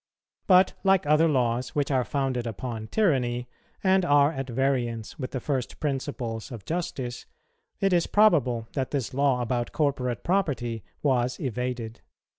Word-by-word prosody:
But, 185 Hz, -1 st, +6 dB
like 190 Hz, -1 st, +4 dB
other 150 Hz, +2 st, +4 dB
laws 125 Hz, -4 st, 0 dB
which 145 Hz, -1 st, 0 dB
are 130 Hz, -2 st, +2 dB
founded 130 Hz, -3 st, -1 dB
upon 115 Hz, 0 st, -5 dB
tyranny, 125 Hz, -, +1 dB, 0.4 s
and 190 Hz, -1 st, +4 dB
are 145 Hz, -2 st, +4 dB
at 135 Hz, -3 st, -5 dB
variance 120 Hz, -3 st, -1 dB
with 130 Hz, -, -3 dB
the 130 Hz, -, -3 dB
first 130 Hz, -2 st, -3 dB
principles 135 Hz, -5 st, -3 dB
of 115 Hz, -5 st, -8 dB
justice, 135 Hz, -7 st, -4 dB, 0.5 s
it 195 Hz, -2 st, +2 dB
is 175 Hz, -1 st, +3 dB
probable 135 Hz, -, +3 dB
that 135 Hz, -2 st, -1 dB
this 135 Hz, -5 st, -2 dB
law 135 Hz, -2 st, +2 dB
about 120 Hz, 0 st, -2 dB
corporate 135 Hz, -5 st, -1 dB
property 130 Hz, -, -1 dB, 0.2 s
was 125 Hz, -3 st, +1 dB
evaded. 125 Hz, -3 st, -4 dB
130 Hz, 145 wpm, -26 LUFS, 120-150 Hz, 0.5 s, But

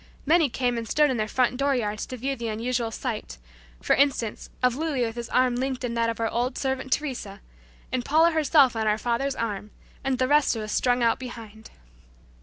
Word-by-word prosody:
Many 320 Hz, 0 st, +4 dB
came 245 Hz, -1 st, -1 dB
and 230 Hz, -, -7 dB
stood 300 Hz, -2 st, +3 dB
in 255 Hz, -, -1 dB
their 215 Hz, -1 st, -1 dB
front 250 Hz, +2 st, +1 dB
door 275 Hz, 0 st, +2 dB
yards 215 Hz, -3 st, -2 dB
to 255 Hz, -, -6 dB
view 270 Hz, +3 st, -2 dB
the 235 Hz, -2 st, -5 dB
unusual 230 Hz, +2 st, -1 dB
sight, 60 Hz, -, -5 dB, 0.5 s
for -, -, +3 dB
instance, 270 Hz, -6 st, 0 dB
of 250 Hz, -1 st, +3 dB
Louis 295 Hz, -4 st, -1 dB
with 225 Hz, -, -4 dB
his 235 Hz, -1 st, -6 dB
arm 255 Hz, -1 st, +2 dB
linked 260 Hz, 0 st, -2 dB
in 240 Hz, -2 st, -2 dB
that 230 Hz, 0 st, +1 dB
of 230 Hz, -, -4 dB
our 225 Hz, -, +1 dB
old 245 Hz, +3 st, -1 dB
servant 265 Hz, -1 st, -2 dB
Teresa, 245 Hz, -10 st, -2 dB, 0.5 s
and 255 Hz, -1 st, -1 dB
Paula 320 Hz, +6 st, +4 dB
herself 295 Hz, -5 st, +4 dB
on 220 Hz, -1 st, -1 dB
our 210 Hz, 0 st, +2 dB
father's 245 Hz, +4 st, -1 dB
arm, 210 Hz, -2 st, -3 dB, 0.3 s
and 270 Hz, -1 st, 0 dB
the 255 Hz, -, +1 dB
rest 290 Hz, -2 st, +3 dB
of 220 Hz, -, -4 dB
us 215 Hz, -, -5 dB
strung 245 Hz, -1 st, +2 dB
out 230 Hz, -1 st, +2 dB
behind. 225 Hz, -4 st, -9 dB
245 Hz, 210 wpm, -25 LUFS, 230-270 Hz, 0.5 s, Many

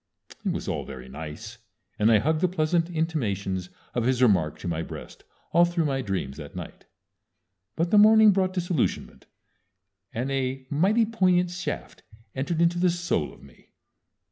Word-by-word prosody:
It -, -, 0 dB
was -, -, -4 dB
all -, -, -2 dB
very 65 Hz, 0 st, -9 dB
nice, 80 Hz, -, -8 dB, 0.4 s
and 110 Hz, +2 st, +4 dB
I 110 Hz, -, +6 dB
hugged 155 Hz, +8 st, +1 dB
the 185 Hz, -, +4 dB
pleasant 165 Hz, -1 st, 0 dB
intimations 100 Hz, -, -2 dB, 0.2 s
of 120 Hz, -2 st, 0 dB
his 130 Hz, -1 st, +1 dB
remark 95 Hz, -, +3 dB
to -, -, -7 dB
my 80 Hz, -1 st, -1 dB
breast -, -, -9 dB, 0.3 s
all 170 Hz, +1 st, +5 dB
through 175 Hz, -1 st, +1 dB
my 135 Hz, -2 st, 0 dB
dreams 90 Hz, -, -3 dB
that 75 Hz, -3 st, -9 dB
night. -, -, -8 dB, 0.9 s
But 170 Hz, +2 st, 0 dB
the 210 Hz, -, +6 dB
morning 215 Hz, 0 st, +7 dB
brought 185 Hz, -1 st, +1 dB
disillusionment, 175 Hz, -6 st, -2 dB, 0.8 s
and 125 Hz, +4 st, -3 dB
a 135 Hz, -1 st, -2 dB
mighty 200 Hz, +10 st, +3 dB
poignant 185 Hz, -5 st, +2 dB
shaft 180 Hz, +1 st, -5 dB, 0.3 s
entered 160 Hz, +5 st, 0 dB
into 170 Hz, +1 st, +2 dB
the 180 Hz, 0 st, +4 dB
soul 170 Hz, -, -1 dB
of -, -, -17 dB
me. 70 Hz, -3 st, -19 dB
150 Hz, 165 wpm, -26 LUFS, -, 0.9 s, morning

